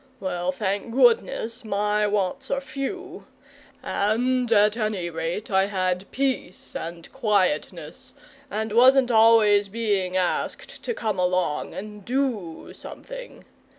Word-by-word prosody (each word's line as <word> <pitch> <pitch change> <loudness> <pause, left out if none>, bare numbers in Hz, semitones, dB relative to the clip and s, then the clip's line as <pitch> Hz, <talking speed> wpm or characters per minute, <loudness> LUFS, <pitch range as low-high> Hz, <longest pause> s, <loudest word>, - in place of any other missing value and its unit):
Well, 180 -1 -2
thank 200 +3 -3
goodness, 240 -1 +2
my 210 0 0
wants 200 -3 -1
are 275 - 0
few, 350 +8 -6 0.6
and 245 +4 0
at 210 -1 +4
any 210 -6 -2
rate 165 +6 -4
I 190 0 +4
had 185 -1 -1
peace 260 -9 -3
and 170 0 -6
quietness 200 - -1 0.4
and 220 +1 -3
wasn't 255 +2 +5
always 220 -3 +5
being 200 -4 -1
asked 180 -1 -2
to 475 - -2
come 215 - -2
along 180 -4 0
and 210 +1 -8
DO 235 -9 -2
something. - - -10
210 Hz, 120 wpm, -24 LUFS, 185-245 Hz, 0.6 s, wasn't